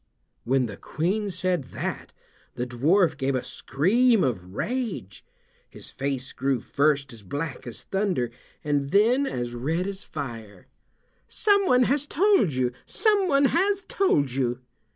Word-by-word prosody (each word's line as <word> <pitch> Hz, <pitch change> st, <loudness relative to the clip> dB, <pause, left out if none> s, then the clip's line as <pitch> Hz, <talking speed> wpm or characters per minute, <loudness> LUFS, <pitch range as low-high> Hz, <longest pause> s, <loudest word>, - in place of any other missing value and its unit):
When 130 Hz, +1 st, +2 dB
the 100 Hz, -4 st, -7 dB
Queen 200 Hz, +7 st, -2 dB
said 180 Hz, -5 st, -1 dB
that -, -, -4 dB, 0.4 s
the 125 Hz, -, -2 dB
dwarf 155 Hz, +10 st, +2 dB
gave 135 Hz, -1 st, 0 dB
a 130 Hz, -, -1 dB
scream 225 Hz, -, +2 dB
of 95 Hz, -7 st, -3 dB
rage. 225 Hz, -, -3 dB, 0.5 s
His -, -, -9 dB
face 135 Hz, -1 st, -3 dB
grew 135 Hz, -1 st, 0 dB
first 140 Hz, +1 st, 0 dB
as 115 Hz, -, -11 dB
black 140 Hz, -, -5 dB
as 120 Hz, -, -7 dB
thunder, 190 Hz, -, -1 dB, 0.3 s
and 145 Hz, -2 st, 0 dB
then 235 Hz, -, +3 dB
as 120 Hz, -, -3 dB
red 155 Hz, +9 st, -1 dB
as 200 Hz, 0 st, -5 dB
fire. 115 Hz, -, -7 dB, 0.6 s
"Someone 395 Hz, -12 st, +3 dB
has 280 Hz, +3 st, +1 dB
told 375 Hz, -, +3 dB
you! 130 Hz, -1 st, 0 dB, 0.2 s
Someone 380 Hz, -10 st, +3 dB
has 390 Hz, +6 st, +2 dB
told 145 Hz, -, +2 dB
you!" 125 Hz, -1 st, -1 dB
150 Hz, 135 wpm, -25 LUFS, -, 0.6 s, then